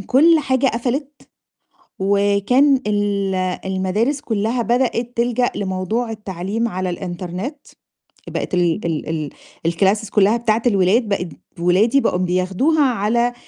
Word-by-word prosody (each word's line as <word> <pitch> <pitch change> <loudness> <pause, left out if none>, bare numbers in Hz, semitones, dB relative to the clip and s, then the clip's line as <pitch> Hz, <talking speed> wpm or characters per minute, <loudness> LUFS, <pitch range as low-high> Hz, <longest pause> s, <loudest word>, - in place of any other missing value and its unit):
كل 310 - +4
حاجة 265 -2 +1
قفلت، 265 +4 -3 0.7
وكان 200 +8 +3
ال 205 -2 0 0.3
المدارس 190 +9 -1
كُلّها 225 +2 -1
بدأت 240 0 0
تلجأ 245 +1 +1
لموضوع 200 +5 -2
التعليم 210 +2 -3
على 185 -2 -3
الإنترنت. 180 - -5 0.7
بقت - - -4
ال 175 +1 +1
ال 160 -2 -2
ال 155 -2 -3 0.4
الclasses 200 +5 +1
كُلّها 205 +2 +3
بتاعة 230 -1 +1
الولاد 205 +2 +2
بقت 185 -3 -1 0.3
ولادي 200 +10 +3
بقوا 180 - +1
بياخدوها 185 - +1
على 235 0 +1
210 Hz, 115 wpm, -20 LUFS, 185-245 Hz, 0.7 s, كل